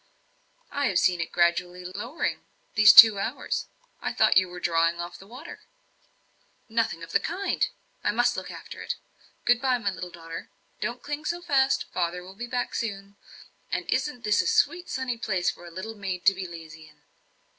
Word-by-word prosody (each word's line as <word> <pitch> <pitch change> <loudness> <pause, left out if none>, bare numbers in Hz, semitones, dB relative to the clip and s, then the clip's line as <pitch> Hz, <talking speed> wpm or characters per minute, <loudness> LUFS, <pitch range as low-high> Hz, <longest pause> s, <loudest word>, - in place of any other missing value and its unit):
"I 285 -1 0
have 190 - +1
seen 180 -1 +3
it 165 - -4
gradually 175 +1 +1
lowering 210 - -3 0.3
these 215 0 +8
two 220 -3 +10
hours. 230 +7 -3 0.3
I - - -2
thought - - +4
you 185 0 +5
were 180 0 -8
drawing 170 0 +1
off 175 0 -6
the 195 - -14
water." 255 +10 -10 1.1
"Nothing 220 -7 -1
of 165 - -9
the - - +3
kind 380 +4 -1 0.4
I - - +1
must 240 +4 +2
look - - -5
after - - -9
it. - - -3 0.5
Good 245 0 +4
bye, 260 -2 +2
my 205 -4 -1
little 180 -1 -7
daughter. 165 -1 -9 0.3
Don't 240 +1 -4
cling 295 +1 -5
so 345 +2 -1
fast; 275 -6 +2
father 180 0 -1
will 185 +1 -11
be 240 +5 -6
back 245 0 -2
soon 200 -3 -4 0.6
and - - -1
isn't 250 -5 -1
this 210 -1 +3
a - - -3
sweet 420 -6 +2
sunny 255 -3 -3
place 185 -6 0
for 175 - -13
a - - -8
little 190 +6 -6
maid 190 -4 -5
to 195 - +7
be 190 -1 -5
lazy 160 -2 -11
in?" - - -25
200 Hz, 190 wpm, -26 LUFS, 175-245 Hz, 1.1 s, two